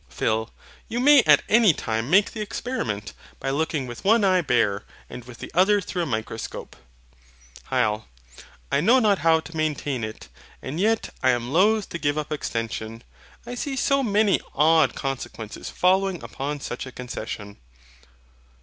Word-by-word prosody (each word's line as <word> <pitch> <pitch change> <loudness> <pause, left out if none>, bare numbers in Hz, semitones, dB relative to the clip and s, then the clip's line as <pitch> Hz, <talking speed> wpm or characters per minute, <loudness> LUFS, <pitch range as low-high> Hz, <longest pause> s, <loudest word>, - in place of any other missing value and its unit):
PHIL. 110 - -1 0.4
You 235 - -3
may 285 +1 +7
at - - +6
any 220 -5 +5
time 115 -2 -3
make 195 +4 +4
the 220 - -6
experiment, 115 - -4 0.3
by 135 - -2
looking 150 -1 -1
with 120 -1 -9
one 220 +2 +4
eye 185 -2 +4
bare, 115 -8 +1 0.3
and 125 - -8
with 125 -1 -12
the - - -9
other 195 +4 +4
through 180 -2 -4
a - - 0
microscope. 110 -2 -5 0.9
HYL. 110 -5 0 0.7
I 140 +1 +2
know 235 +10 +5
not 210 -6 +3
how 160 0 +3
to 165 +1 -12
maintain 145 -5 -2
it; 110 0 -7 0.3
and 145 +6 -5
yet 220 +3 +1
I 130 - +3
am 120 +1 0
loath 210 +4 +3
to 170 - -5
give 145 -1 0
up 150 0 -4
EXTENSION, 115 -4 -4 0.4
I 240 - -6
see 270 +3 -3
so 275 +1 +2
many 210 -4 +2 0.2
odd 160 +1 +4
consequences 130 -5 -5
following 190 0 +1
upon 145 +1 -5
such 125 0 -5
a - - -8
concession. 110 -5 -7
150 Hz, 160 wpm, -24 LUFS, 120-200 Hz, 0.9 s, may